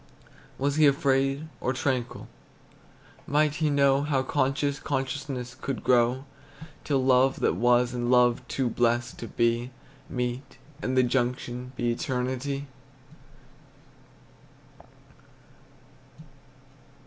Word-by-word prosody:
Was 140 Hz, +2 st, 0 dB
he 155 Hz, -1 st, +6 dB
afraid, 135 Hz, +1 st, +1 dB
or 130 Hz, -, -1 dB
tranquil? 130 Hz, -2 st, -2 dB, 1.0 s
Might 150 Hz, +1 st, +2 dB
he 155 Hz, -2 st, +1 dB
know 140 Hz, -1 st, +3 dB
How 140 Hz, -2 st, 0 dB
conscious 140 Hz, +1 st, 0 dB
consciousness 135 Hz, -2 st, -3 dB
could 135 Hz, +1 st, -5 dB
grow, 125 Hz, +2 st, +2 dB, 0.6 s
Till 135 Hz, -3 st, 0 dB
love 130 Hz, +1 st, +4 dB
that -, -, +2 dB
was, 120 Hz, +5 st, +2 dB
and 120 Hz, -1 st, -2 dB
love 125 Hz, -1 st, +4 dB
too 130 Hz, -1 st, -1 dB
blest 120 Hz, 0 st, 0 dB
to 115 Hz, -, -6 dB
be, 120 Hz, +2 st, 0 dB, 0.4 s
Meet 125 Hz, +1 st, -4 dB, 0.2 s
and 130 Hz, 0 st, -1 dB
the 130 Hz, -, +6 dB
junction 125 Hz, 0 st, -2 dB
be 120 Hz, -1 st, 0 dB
Eternity? 130 Hz, +3 st, -2 dB
130 Hz, 100 wpm, -27 LUFS, 125-140 Hz, 1.0 s, he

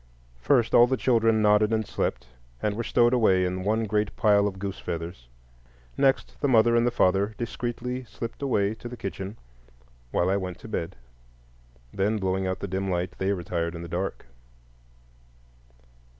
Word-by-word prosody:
First, 120 Hz, -, +2 dB
all 120 Hz, -, +7 dB
the 130 Hz, +1 st, 0 dB
children 115 Hz, -3 st, +3 dB
nodded 105 Hz, +1 st, +4 dB
and 110 Hz, -1 st, +1 dB
slept, -, -, -2 dB, 0.3 s
and 105 Hz, +6 st, -1 dB
were 115 Hz, -, -2 dB
stowed 120 Hz, +1 st, +3 dB
away 95 Hz, -7 st, +3 dB
in 90 Hz, +1 st, -3 dB
one 110 Hz, +3 st, +1 dB
great 105 Hz, -1 st, -1 dB
pile 105 Hz, -1 st, +4 dB
of 95 Hz, -2 st, -5 dB
goose 95 Hz, 0 st, -5 dB
feathers; 85 Hz, -7 st, -6 dB, 0.7 s
next, 135 Hz, -1 st, +1 dB
the 145 Hz, -, +2 dB
mother 115 Hz, -2 st, +4 dB
and 120 Hz, +1 st, +3 dB
the -, -, +4 dB
father 100 Hz, -2 st, +1 dB
discreetly 120 Hz, +2 st, -4 dB
slipped 115 Hz, +2 st, -7 dB
away 105 Hz, -7 st, +1 dB
to 120 Hz, +2 st, -9 dB
the 125 Hz, -, -8 dB
kitchen 95 Hz, +1 st, -6 dB, 0.7 s
while 85 Hz, -, +1 dB
I 100 Hz, -, +2 dB
went 90 Hz, -2 st, -5 dB
to -, -, -9 dB
bed; 95 Hz, -4 st, -4 dB, 1.0 s
then, 105 Hz, +3 st, +1 dB
blowing 95 Hz, -1 st, -1 dB
out 95 Hz, +1 st, -3 dB
the 100 Hz, -, -3 dB
dim 95 Hz, +1 st, -2 dB
light, 90 Hz, 0 st, -1 dB
they 95 Hz, +1 st, +1 dB
retired 85 Hz, -2 st, -2 dB
in 85 Hz, -, -6 dB
the -, -, -7 dB
dark. 90 Hz, +3 st, -4 dB
105 Hz, 170 wpm, -26 LUFS, 95-115 Hz, 1.0 s, all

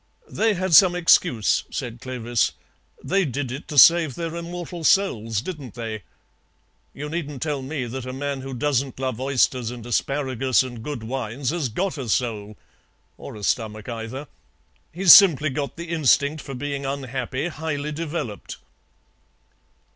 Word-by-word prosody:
"They 220 Hz, -1 st, +1 dB
had 185 Hz, -1 st, -2 dB
some 180 Hz, +1 st, +7 dB
excuse," 165 Hz, -, +3 dB
said 120 Hz, -1 st, -5 dB
Clovis. 120 Hz, -2 st, -1 dB, 0.5 s
"They 195 Hz, +1 st, +1 dB
did 140 Hz, -3 st, -3 dB
it 135 Hz, +4 st, -7 dB
to 150 Hz, -, -6 dB
save 165 Hz, -1 st, +7 dB
their 165 Hz, -1 st, -4 dB
immortal 170 Hz, 0 st, -6 dB
souls, 115 Hz, -, +2 dB
didn't 145 Hz, -, -8 dB
they? 110 Hz, -3 st, -5 dB, 0.9 s
You 145 Hz, +2 st, -7 dB
needn't 150 Hz, -3 st, -4 dB
tell 150 Hz, -3 st, -2 dB
me 135 Hz, -1 st, -4 dB
that 130 Hz, +2 st, -6 dB
a -, -, -4 dB
man 140 Hz, +1 st, -4 dB
who 135 Hz, 0 st, -6 dB
doesn't 135 Hz, 0 st, -1 dB
love 130 Hz, -3 st, -3 dB
oysters 130 Hz, -3 st, +1 dB
and 120 Hz, -2 st, -8 dB
asparagus 130 Hz, 0 st, +1 dB
and 120 Hz, -3 st, -8 dB
good 135 Hz, -2 st, -5 dB
wines 125 Hz, +2 st, -3 dB
has 160 Hz, -6 st, -2 dB
got 175 Hz, -, -2 dB
a 125 Hz, -4 st, -5 dB
soul, 110 Hz, -2 st, -2 dB, 0.6 s
or -, -, -10 dB
a 105 Hz, -, -10 dB
stomach 110 Hz, -1 st, -2 dB
either. 120 Hz, +5 st, -6 dB, 0.6 s
He's 180 Hz, 0 st, +8 dB
simply 155 Hz, -7 st, +7 dB
got 140 Hz, +2 st, -4 dB
the 170 Hz, 0 st, -7 dB
instinct 150 Hz, -1 st, +2 dB
for 135 Hz, -, -8 dB
being 140 Hz, +1 st, -4 dB
unhappy 135 Hz, +2 st, -3 dB
highly 150 Hz, -2 st, -4 dB
developed." 150 Hz, -8 st, -5 dB
135 Hz, 150 wpm, -23 LUFS, 120-160 Hz, 0.9 s, He's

